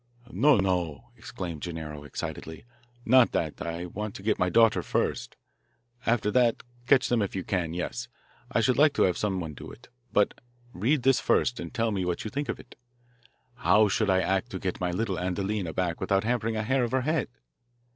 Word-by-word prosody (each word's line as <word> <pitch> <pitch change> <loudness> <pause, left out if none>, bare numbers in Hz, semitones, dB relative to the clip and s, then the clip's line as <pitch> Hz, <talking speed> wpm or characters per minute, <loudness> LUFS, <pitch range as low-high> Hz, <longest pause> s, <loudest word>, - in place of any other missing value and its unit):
"No, 140 +8 +4
no!" 95 +2 -1
exclaimed 95 - -7
Gennaro 75 -3 -6
excitedly. 80 +4 -6 0.4
"Not 125 +1 +5
that. 80 -3 -2
I 85 +1 -4
want 105 +4 -5
to 95 - -9
get 105 0 +1
my 90 - +2
daughter 115 +4 +4
first. - - -2 0.7
After 115 -2 +2
that, 120 -1 +2 0.2
catch 135 -1 +5
them 120 -2 +2
if 100 - -2
you 95 - -2
can 85 -4 -2
yes, 85 -9 -4 0.4
I 115 - +2
should 130 +3 +2
like 150 0 +5
to - - +3
have 90 - +2
someone 95 -7 -2
do - - -10
it. 120 - -14 0.2
But 105 - +3 0.4
read 125 +8 +1
this 135 -1 +4
first 125 - +1
and - - -6
tell 115 -3 0
me 95 -3 -1
what 90 -1 -2
you 110 - -4
think 140 -1 -3
of - - -3
it. - - -14 0.8
How 110 -5 +4
should 105 +2 +1
I 95 0 +4
act 95 0 0
to - - -5
get - - -3
my 90 - 0
little 95 +1 -2
Adelina 95 0 -2
back 85 -1 -2
without 95 0 +1
harming 115 -1 0
a 110 - -1
hair 130 +3 +1
of 120 - -2
her 130 - +2
head?" 155 +5 0
100 Hz, 195 wpm, -27 LUFS, 90-120 Hz, 0.8 s, Not